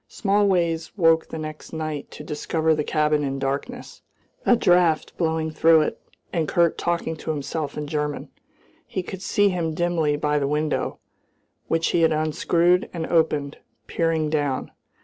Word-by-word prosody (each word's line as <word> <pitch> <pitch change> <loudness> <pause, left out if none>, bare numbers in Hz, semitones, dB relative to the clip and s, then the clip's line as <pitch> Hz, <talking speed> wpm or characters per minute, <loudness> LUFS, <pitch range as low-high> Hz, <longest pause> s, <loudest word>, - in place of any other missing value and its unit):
Smallways 190 -5 0
woke 165 -3 +4
the - - -6
next 155 0 -7
night 155 -2 -4
to - - -10
discover 160 +1 0
the 150 -1 0
cabin 150 -1 +1
in 135 -1 -2
darkness, 140 - -4 0.5
a 245 - +7
draught 175 -6 +2
blowing 160 -1 -1
through 160 0 +5
it, - - -3 0.3
and 165 -4 0
Kurt 170 -1 +2
talking 170 -2 -2
to 160 - -7
himself 150 0 -3
in 150 - -3
German. 150 0 -3 0.6
He 185 - -3
could 185 +1 -7
see 205 +1 +2
him 165 -4 -2
dimly 165 -4 +1
by 150 0 +1
the 140 - 0
window, 150 +1 -1 0.7
which 165 0 +1
he 170 - +2
had 160 -1 +4
unscrewed 170 +3 +2
and 165 -1 -2
opened, 150 -4 0 0.3
peering 160 -2 0
down. 145 -4 -1
160 Hz, 155 wpm, -23 LUFS, 150-170 Hz, 0.7 s, a